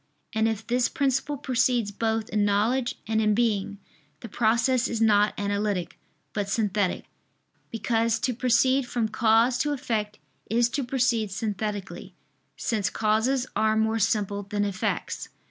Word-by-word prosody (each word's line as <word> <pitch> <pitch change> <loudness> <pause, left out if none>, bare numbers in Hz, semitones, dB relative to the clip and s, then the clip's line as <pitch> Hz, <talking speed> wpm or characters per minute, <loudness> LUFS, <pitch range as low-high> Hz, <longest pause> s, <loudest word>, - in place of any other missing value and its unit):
And 220 0 +2
if 220 -1 -3
this 245 +1 +1
principle 275 +1 0
precedes 245 -4 +1
both 220 +1 -1
in 210 -1 +1
knowledge 225 +5 +1
and 220 0 0
in 210 -1 +2
being, 205 -3 0 0.4
the 230 - -8
process 235 +4 +2
is 230 - -3
not 210 -2 +3
analytic, 200 -3 -2 0.3
but 205 -2 -2
synthetic: 205 -3 0 0.6
because 230 0 0
to 255 - 0
proceed 255 +2 +2
from 235 -2 -1
cause 225 +3 +3
to 295 0 +1
effect 220 -6 -3 0.3
is 235 +1 +2
to 275 +2 -2
proceed 240 -4 0
synthetically, 205 -1 -4 0.4
since 215 -4 -1
causes 225 +4 +1
are 220 0 +2
more 220 +1 +1
simple 205 -1 0
than 205 +1 -2
effects. 195 -2 -3
220 Hz, 140 wpm, -26 LUFS, 210-240 Hz, 0.6 s, not